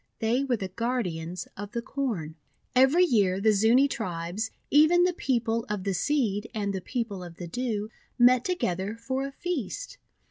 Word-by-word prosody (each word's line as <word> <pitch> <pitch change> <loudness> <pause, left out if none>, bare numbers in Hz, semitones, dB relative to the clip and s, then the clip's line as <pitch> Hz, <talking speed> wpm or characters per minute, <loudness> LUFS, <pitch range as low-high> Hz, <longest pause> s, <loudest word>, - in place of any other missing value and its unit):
They 235 +4 +1
were 255 -4 0
the 190 -2 -4
guardians 185 -6 -3
of 205 +1 -7
the 235 - -1
Corn. 220 - -3 0.4
Every 270 +8 +6
year 200 - +2
the 220 +2 +4
Zuni 225 +7 +4
tribes, 185 -3 -3 0.2
even 310 +4 +6
the 360 0 +2
People 230 -6 0
of 210 -3 -2
the 195 0 -1
Seed 215 - 0
and 200 -2 -1
the 190 - -3
People 225 -4 -4
of 170 -1 -10
the 175 - -7
Dew, 220 +1 -3 0.3
met 245 0 +6
to 365 - +1
gether 190 - -2
for 260 +4 -3
a - - -8
feast. 355 - -4
225 Hz, 175 wpm, -27 LUFS, 195-265 Hz, 0.4 s, Every